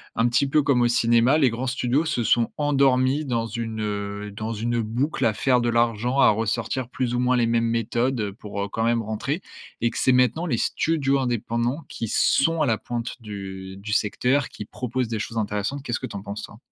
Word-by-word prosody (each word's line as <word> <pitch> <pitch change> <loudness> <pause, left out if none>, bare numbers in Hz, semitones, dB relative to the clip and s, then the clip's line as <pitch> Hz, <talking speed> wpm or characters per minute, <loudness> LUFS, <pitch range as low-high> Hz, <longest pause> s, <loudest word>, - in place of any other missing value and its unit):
Un 115 - +3
petit 125 +4 +2
peu 150 +1 +4
comme 135 -3 +3
au 120 - +4
cinéma, 120 +4 +4
les 135 -5 +4
grands 120 +3 -3
studios 130 +4 +1
se 120 -7 0
sont 115 0 +2
endormis 140 -1 +2
dans 120 -4 -1
une, 115 -1 -4
heu, 100 0 -4
dans 110 +2 -5
une 115 +2 -1
boucle 125 +6 -1
à 110 - +3
faire 125 +2 +2
de 120 - +1
l'argent, 120 +2 +1
à - - +6
ressortir 115 +3 -2
plus 125 -2 -2
ou 120 - 0
moins 125 0 +2
les 120 - +3
mêmes 115 0 +1
méthodes, 115 -1 0
pour, 100 0 -6
heu, - - -3
quand 115 +3 -3
même 115 0 +2
rentrer 110 - -3 0.4
et 120 - +1
que - - -7
c'est 130 - +4
maintenant 125 +7 +2
les 120 - 0
studios 140 0 +1
indépendants 120 +3 -1
qui 115 - -5
sont 160 +9 +2
à - - +2
la 115 -4 +1
pointe 120 +1 -4
du 95 -3 -7
du 105 +2 -5
secteur, 125 +7 +1
qui 105 - -8
proposent 125 +2 -3
des 110 -1 -3
choses 115 +2 -5
intéressantes, 105 +6 -2
qu'est-ce 120 -3 -2
que - - -5
tu 100 - -7
en 100 - -8
penses 100 +1 -6
toi? 105 - -10
120 Hz, 220 wpm, -24 LUFS, 110-130 Hz, 0.4 s, à